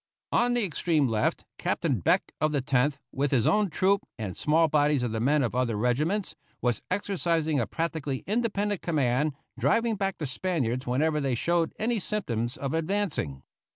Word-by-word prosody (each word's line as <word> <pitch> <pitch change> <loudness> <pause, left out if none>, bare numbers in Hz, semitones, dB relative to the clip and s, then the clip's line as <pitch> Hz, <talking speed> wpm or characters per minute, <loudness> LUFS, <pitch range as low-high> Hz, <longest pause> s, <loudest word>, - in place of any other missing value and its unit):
On 245 +1 +3
the 240 - +2
extreme 160 -4 +1
left 110 -2 0
Captain - - 0
Beck, - - +2
of 155 0 +2
the 145 - +1
Tenth, 135 +2 +1
with 140 +1 0
his 125 -5 +2
own 210 -2 +3
troop, 195 +4 +2
and 105 -6 -4
small 160 +2 +3
bodies 145 -3 +2
of 120 - -1
the 110 - -2
men 140 +5 +3
of 120 - -1
other 125 -3 0
regiments, 150 - 0 0.2
was 120 -4 0
exercising 170 -6 0
a 115 - 0
practically 160 -4 -3
independent 210 -2 0
command, 145 -2 +1 0.3
driving 230 -1 +2
back 195 -1 -1
the 155 - -3
Spaniards 130 -5 -2
whenever 150 +5 +1
they 135 -3 0
showed 170 +6 0
any 230 +1 0
symptoms 120 - -2
of 140 +1 -3
advancing. 160 - -1
150 Hz, 170 wpm, -27 LUFS, 125-185 Hz, 0.3 s, On